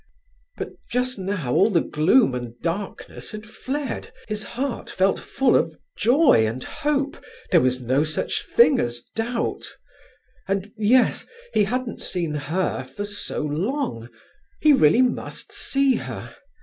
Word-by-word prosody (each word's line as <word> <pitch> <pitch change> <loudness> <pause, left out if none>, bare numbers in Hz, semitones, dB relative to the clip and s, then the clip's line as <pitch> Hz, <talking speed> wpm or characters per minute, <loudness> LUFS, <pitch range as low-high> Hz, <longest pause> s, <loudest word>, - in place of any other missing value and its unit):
But - - -4 0.2
just 250 -2 0
now 185 -10 -2
all 200 - +5
the 180 -6 +3
gloom 160 - +3
and 120 -1 -6
darkness 180 +4 -4
had 215 0 -7
fled, 265 +5 -4 0.2
his 215 -1 -3
heart 265 0 -4
felt 190 +1 +2
full 265 -3 +1
of 160 -1 +1 0.2
joy 250 - +5
and 120 +4 -4
hope, 290 -2 -2 0.3
there 170 -4 +6
was 125 0 +1
no 130 +5 +2
such 155 0 -2
thing 385 - +5
as 120 0 -2
doubt. 230 +1 -3 0.7
And 195 +1 -1
yes, 230 +4 +3 0.3
he 210 - +4
hadn't 250 +3 -3
seen 170 -4 -2
her 150 +1 -1
for 135 +11 -6
so 205 0 -3
long; 155 - -2 0.5
he 305 -1 +6
really 235 - +5
must 250 - -2
see 275 -1 +2
her. - - -7
205 Hz, 140 wpm, -23 LUFS, 150-255 Hz, 0.7 s, there